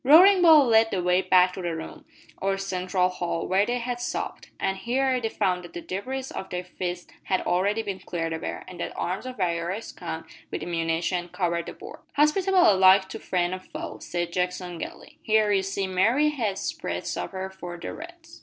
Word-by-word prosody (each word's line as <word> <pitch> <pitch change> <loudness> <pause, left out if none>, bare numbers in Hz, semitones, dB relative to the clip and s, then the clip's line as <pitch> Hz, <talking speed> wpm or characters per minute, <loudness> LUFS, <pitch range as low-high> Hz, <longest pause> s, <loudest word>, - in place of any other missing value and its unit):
Roaring 360 +8 +8
Bull 315 -5 +8
led 225 -1 +5
the 185 -5 -1
way 180 +1 +3
back 185 -1 +4
to 190 - -6
the 170 -2 -2
room, 160 - -8 0.4
or 195 0 +1
central 185 -1 0
hall, 175 -2 -3
where 195 +2 +3
they 245 +1 0
had 245 0 -3
supped, 245 - -4
and 195 0 0
here 255 +3 +1
they 225 - -1
found 185 -5 0
that 175 - -11
the 175 - -5
debris 255 +10 -4
of 190 - -6
their 180 0 -3
feast 180 0 -5
had 185 - +1
already 200 +5 +1
been 200 -3 -4
cleared 165 -3 -3
away, 160 - -4
and 185 -1 -10
that - - -5
arms 185 +8 -2
of 255 - -7
various 180 +3 -2
kinds, - - -6 0.2
with - - -4
ammunition, 170 +1 -1
covered 170 -2 -1
the - - -6
board. - - -11 0.2
"Hospitable 360 - +4
alike 190 0 +6
to - - -6
friend 180 -1 0
and 185 - -5
foe," - - -7
said 175 -1 -3
Jackson 180 -1 -2
gaily. - - -8
"Here, 215 -1 +3
you 195 -1 +3
see, 195 +1 -2
Mary 225 +11 +3
has 220 -10 -2
spread - - -3
supper 190 0 -4
for 175 -2 -8
the - - -5
Reds!" 335 0 -11
190 Hz, 200 wpm, -26 LUFS, 180-235 Hz, 0.4 s, Roaring